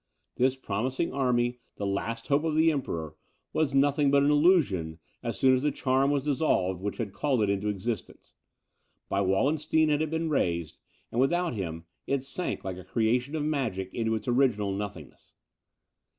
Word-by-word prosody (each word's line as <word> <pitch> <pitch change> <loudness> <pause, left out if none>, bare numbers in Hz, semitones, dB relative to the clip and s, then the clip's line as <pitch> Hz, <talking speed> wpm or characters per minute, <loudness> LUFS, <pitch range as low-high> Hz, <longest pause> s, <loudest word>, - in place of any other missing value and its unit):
This 130 +1 +3
promising 130 +5 -2
army, 125 -2 +1 0.2
the 100 - -4
last 115 +4 -2
hope 145 +2 +2
of 160 -2 0
the 160 +1 +5
Emperor, 80 - -4 0.4
was 145 -4 +1
nothing 140 +1 +3
but 140 0 +4
an 145 - +4
illusion, 145 - +3 0.2
as 115 -4 -4
soon 130 +5 +5
as 130 - +2
the 150 +1 +1
charm 135 0 +1
was 140 -2 +1
dissolved 130 - +1
which 100 +1 -3
had 105 -5 -4
called 130 +1 +1
it 100 - +2
into 100 +1 -1
existence; 105 +1 -5 0.8
by 100 - +1
Wallenstein 150 +10 +2
it 150 +1 +2
had 155 - 0
been 160 +1 -1
raised, 85 - -1 0.3
and, 120 - +1
without 175 +4 +1
him, 85 -6 -5 0.2
it 140 -1 0
sank 155 +6 -3
like 95 -1 -4
a 95 - -9
creation 125 - 0
of 155 - -1
magic 115 -11 -2
into 110 -1 0
its 110 +1 -6
original 120 -5 +2
nothingness. 95 -6 -7
125 Hz, 175 wpm, -28 LUFS, 100-145 Hz, 0.8 s, the